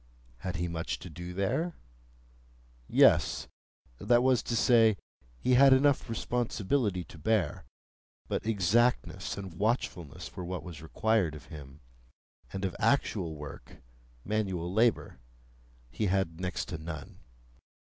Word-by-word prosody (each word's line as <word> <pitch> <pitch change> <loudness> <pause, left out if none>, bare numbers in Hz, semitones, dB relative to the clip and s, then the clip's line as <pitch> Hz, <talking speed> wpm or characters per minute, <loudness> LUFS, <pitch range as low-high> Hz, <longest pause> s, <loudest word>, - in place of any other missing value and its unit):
Had 90 +3 -4
he 85 +2 -1
much 85 -1 -3
to 90 +2 -10
do 90 +3 -7
there? 100 - -1 1.1
Yes; - - +4 0.5
that 120 +3 +3
was 130 -2 +4
to 120 - -3
say, 115 -3 +5 0.4
he 125 - +1
had 135 +1 +8
enough 135 -1 +3
responsibility 115 -3 -1
to 80 - -14
bear; 95 -2 0 0.6
but - - -2
exactness 115 +4 +1
and 95 -3 -6
watchfulness 100 - -2
were 90 - -5
what 90 -2 -4
was 85 -3 -9
required 95 0 +1
of 75 - -11
him, 70 -1 -11 0.7
and 95 0 -3
of 95 - -3
actual 110 - +1
work—manual 75 - -6
labour—he - - -2
had 90 -3 0
next 90 -1 -2
to 80 - -4
none. 80 -3 -8
90 Hz, 120 wpm, -30 LUFS, 80-115 Hz, 1.1 s, had